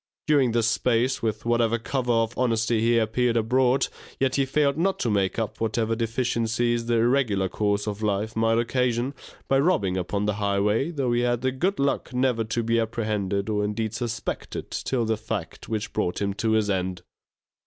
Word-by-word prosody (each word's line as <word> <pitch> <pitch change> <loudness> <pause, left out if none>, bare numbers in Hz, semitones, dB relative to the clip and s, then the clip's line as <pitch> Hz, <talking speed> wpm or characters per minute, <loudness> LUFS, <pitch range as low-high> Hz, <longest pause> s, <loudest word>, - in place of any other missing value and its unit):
During 140 -6 +3
this 115 -1 +2
space, 120 +2 +1
with 110 -1 -2
whatever 115 -1 +2
cover 125 +1 -2
of 115 0 +1
honesty 115 -2 +1
he 115 +1 +3
appeared 115 +2 +1
abroad, 125 +3 +2 0.3
yet 130 -1 +1
he 135 -1 +1
failed 140 +1 +2
not 190 +5 +1
to 115 - +1
make 100 -2 +1
up 110 -1 -3
whatever 115 0 0
deficiencies 120 0 0
the 120 - +2
irregular 115 -5 +2
course 105 +1 0
of 105 0 -4
life 105 +1 -1
might 115 0 +2
occasion, 125 +2 0 0.3
by 135 - +3
robbing 105 - +2
upon 100 +3 -1
the 105 - +1
highway, 105 +7 +1
though 140 -7 -1
he 120 0 +2
had 120 -1 +1
the 130 +1 +1
good 180 +9 -1
luck 140 -3 0
never 125 -3 +1
to 115 +2 -2
be 115 +1 +2
apprehended, 105 -3 -1
or 105 -1 0
indeed 110 +1 -2
suspected 115 0 -4
till 125 -3 -1
the 110 0 0
fact - - -5
which 105 -2 -3
brought 90 - -1
him 100 -1 -1
to 110 +2 0
his 110 -1 +2
end. 95 -2 -2
115 Hz, 185 wpm, -25 LUFS, 105-125 Hz, 0.3 s, During